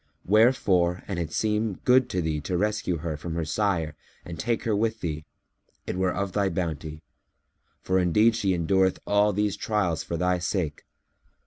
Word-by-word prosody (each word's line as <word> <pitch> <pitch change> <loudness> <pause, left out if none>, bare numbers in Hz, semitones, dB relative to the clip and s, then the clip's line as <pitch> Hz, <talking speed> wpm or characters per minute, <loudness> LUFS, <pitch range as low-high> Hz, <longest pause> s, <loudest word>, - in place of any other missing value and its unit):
Wherefore, 95 -5 +3
an 95 -3 -3
it 80 -2 -3
seem 105 0 0
good 130 +1 +4
to 90 -2 -1
thee 80 -2 -1
to 90 +4 -2
rescue 105 -3 0
her 80 -2 -2
from 80 +2 -6
her 85 -1 -1
sire 80 -3 -1 0.3
and 85 -1 -8
take 115 0 -1
her 110 -2 +1
with 110 +1 -1
thee, 75 -2 -4 0.6
it - - -3
were 95 0 +1
of 100 +1 -2
thy 100 0 +1
bounty, 80 -3 -4 0.8
for 95 0 +2
indeed 105 +6 +3
she 100 -5 +1
endureth 95 +2 +2
all 105 +1 +3
these 105 0 0
trials 100 -6 -1
for 85 - -4
thy 90 +1 +1
sake. 85 -4 -2
95 Hz, 175 wpm, -26 LUFS, 85-105 Hz, 0.8 s, good